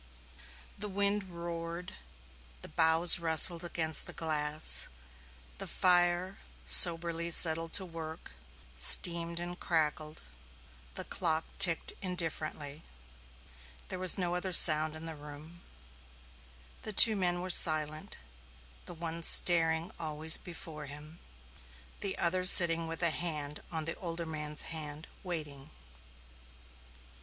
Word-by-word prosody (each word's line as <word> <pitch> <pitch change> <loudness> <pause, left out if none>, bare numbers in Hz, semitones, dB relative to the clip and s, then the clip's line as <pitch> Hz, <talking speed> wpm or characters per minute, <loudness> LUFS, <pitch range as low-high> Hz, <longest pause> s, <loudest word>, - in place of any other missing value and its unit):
The 210 +1 -6
wind 200 +1 -4
roared; 170 0 -9 0.7
the - - -8
boughs 160 +2 0
rustled 165 +1 +4
against 160 -2 -1
the - - -6
glass; 155 -1 +1 0.7
the - - -8
fire, 180 +1 -1 0.3
soberly 165 - +4
settled 165 -1 +3
to 190 - 0
work, 160 - -11 0.4
steamed 170 - +3
and 175 +1 -9
crackled; 155 -1 -5 0.7
the - - -7
clock 160 -2 -4
ticked 170 -3 +1
indifferently; 160 -5 -6 1.1
there 185 - -7
was 185 -2 +3
no 175 -2 -4
other 180 +1 -6
sound 155 -2 +4
in 160 +1 -9
the 165 - -8
room; 150 +3 -14 1.2
the 215 - -8
two 220 +2 +8
men 175 -2 -3
were 185 +1 -6
silent, 155 -2 +4 0.7
the - - -11
one 165 0 -8
staring 165 0 +2
always 160 0 0
before 160 -4 -11
him, 150 +3 -12 0.8
the 195 -1 -4
other 180 +2 -3
sitting 170 -3 +5
with 165 +1 -8
a 170 - +4
hand 150 -4 -5
on 160 -2 -5
the 165 - -5
older 170 -2 -8
man's 150 -1 -7
hand, 155 -1 -8 0.2
waiting. 150 -6 -9
165 Hz, 115 wpm, -28 LUFS, 155-175 Hz, 1.2 s, two